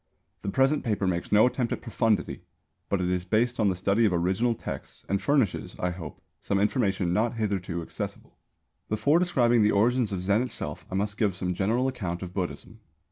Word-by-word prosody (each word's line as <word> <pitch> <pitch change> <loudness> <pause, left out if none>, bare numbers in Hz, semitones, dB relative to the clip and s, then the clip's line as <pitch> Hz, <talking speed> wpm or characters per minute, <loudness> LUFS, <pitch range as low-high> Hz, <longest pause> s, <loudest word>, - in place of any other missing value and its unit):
The 100 - -3
present 135 +7 +2
paper 105 -4 0
makes 90 -2 -1
no 105 +2 +6
attempt 125 -1 0
at - - -6
profundity, 115 -2 0 0.5
but 100 -2 +1
it 90 - 0
is 90 -1 0
based 115 +6 +1
on 105 -2 +4
the 95 - 0
study 100 +5 +2
of 105 - +4
original 95 +8 +1
texts - - -7
and 100 0 0
furnishes, 130 -3 +1
I 90 - -1
hope, 85 -3 -8 0.2
some 100 - -1
information 100 -5 +1
not 110 +4 +1
hitherto 95 -6 -2
accessible. - - -6 0.5
Before 140 +10 +3
describing 120 -10 +3
the 105 0 +4
origins 115 +2 +2
of 90 -2 -3
Zen 100 +4 +2
itself 75 -12 -5
I 95 - -4
must 105 +1 -2
give 100 -5 +2
some 90 -1 -2
general 110 +8 +1
account 95 -9 -3
of 90 -1 -7
Buddhism. 95 +4 -5
105 Hz, 190 wpm, -27 LUFS, 95-120 Hz, 0.5 s, no